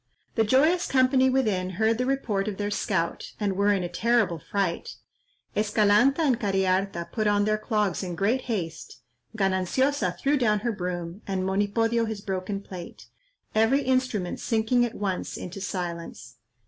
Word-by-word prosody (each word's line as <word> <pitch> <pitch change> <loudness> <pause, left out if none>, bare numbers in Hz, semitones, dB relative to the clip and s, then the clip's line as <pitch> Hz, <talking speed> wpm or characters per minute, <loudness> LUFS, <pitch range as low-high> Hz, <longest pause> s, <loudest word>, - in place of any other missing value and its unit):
The 225 - +2
joyous 305 +11 +3
company 260 0 +4
within 215 -9 +1
heard 225 +1 +2
the 250 - 0
report 220 -7 -1
of 205 -3 -3
their 205 0 -2
scout, 190 -5 -2
and 200 -3 0
were 200 +2 +3
in 195 -3 +1
a - - -1
terrible 210 -1 +1
fright. 190 +1 -2 0.6
Escalanta 215 +7 +3
and 265 -7 +2
Cariharta 190 -3 0
put 215 -2 0
on 205 0 +3
their 215 0 +1
clogs 210 -4 0
in 180 -3 -4
great 210 +9 +1
haste, 165 - -4 0.4
Gananciosa 195 +9 +1
threw 290 +1 +1
down 215 -5 +2
her 235 +1 0
broom, 180 -1 -4
and 190 -1 -1
Monipodio 215 +4 +1
his 215 -2 -5
broken 195 0 -3
plate, 180 -3 -10 0.4
every 225 +6 +3
instrument 255 -8 0
sinking 230 +1 +1
at 240 - -6
once 195 -3 -3
into 185 +2 -7
silence. 170 -8 -5
205 Hz, 155 wpm, -26 LUFS, 190-235 Hz, 0.6 s, company